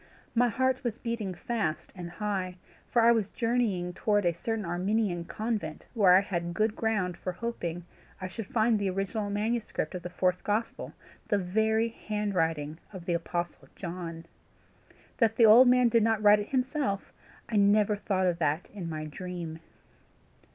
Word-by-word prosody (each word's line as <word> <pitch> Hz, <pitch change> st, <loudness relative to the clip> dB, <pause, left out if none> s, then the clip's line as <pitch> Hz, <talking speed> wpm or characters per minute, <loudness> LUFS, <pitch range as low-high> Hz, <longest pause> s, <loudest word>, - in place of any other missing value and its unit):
My 245 Hz, +1 st, +3 dB
heart 260 Hz, +3 st, 0 dB
was 235 Hz, -2 st, -2 dB
beating 230 Hz, -6 st, -3 dB
fast 190 Hz, -5 st, -3 dB
and 175 Hz, -2 st, -7 dB
high, 185 Hz, -1 st, -3 dB, 0.3 s
for 235 Hz, -2 st, +3 dB
I 235 Hz, -, +7 dB
was 220 Hz, -4 st, +1 dB
journeying 225 Hz, -7 st, 0 dB
towards 205 Hz, +1 st, +1 dB
a 170 Hz, -, +3 dB
certain 220 Hz, +4 st, -3 dB
Armenian 180 Hz, 0 st, 0 dB
convent, 220 Hz, +4 st, -3 dB
where 195 Hz, -6 st, +6 dB
I 190 Hz, -, +6 dB
had 175 Hz, -3 st, -3 dB
good 215 Hz, +2 st, +1 dB
ground 210 Hz, -7 st, 0 dB
for 185 Hz, -, -4 dB
hoping 175 Hz, -6 st, -4 dB, 0.3 s
I 185 Hz, -, -4 dB
should 205 Hz, +2 st, -7 dB
find 220 Hz, 0 st, +2 dB
the 200 Hz, -1 st, 0 dB
original 195 Hz, +3 st, -2 dB
manuscript 215 Hz, +3 st, -2 dB
of 180 Hz, -, -5 dB
the 175 Hz, -, -6 dB
fourth 180 Hz, 0 st, 0 dB
gospel, 215 Hz, +3 st, -2 dB, 0.3 s
the 205 Hz, -, +2 dB
very 220 Hz, +4 st, +1 dB
handwriting 165 Hz, -9 st, -2 dB
of 185 Hz, -4 st, -9 dB
the 175 Hz, -, 0 dB
apostle 175 Hz, 0 st, -3 dB
John. 170 Hz, -2 st, -6 dB, 0.9 s
That 225 Hz, -2 st, +3 dB
the 230 Hz, -, +6 dB
old 235 Hz, +4 st, +9 dB
man 250 Hz, 0 st, +5 dB
did 230 Hz, 0 st, +3 dB
not 220 Hz, -1 st, +1 dB
write 210 Hz, 0 st, +7 dB
it 205 Hz, -, -5 dB
himself, 260 Hz, -6 st, -1 dB, 0.3 s
I 220 Hz, -, -1 dB
never 205 Hz, +1 st, +4 dB
thought 195 Hz, -2 st, 0 dB
of 175 Hz, -2 st, +1 dB
that 155 Hz, +1 st, 0 dB
in 185 Hz, -5 st, -5 dB
my 155 Hz, -1 st, -4 dB
dream. 170 Hz, 0 st, -6 dB
205 Hz, 165 wpm, -29 LUFS, 180-225 Hz, 0.9 s, old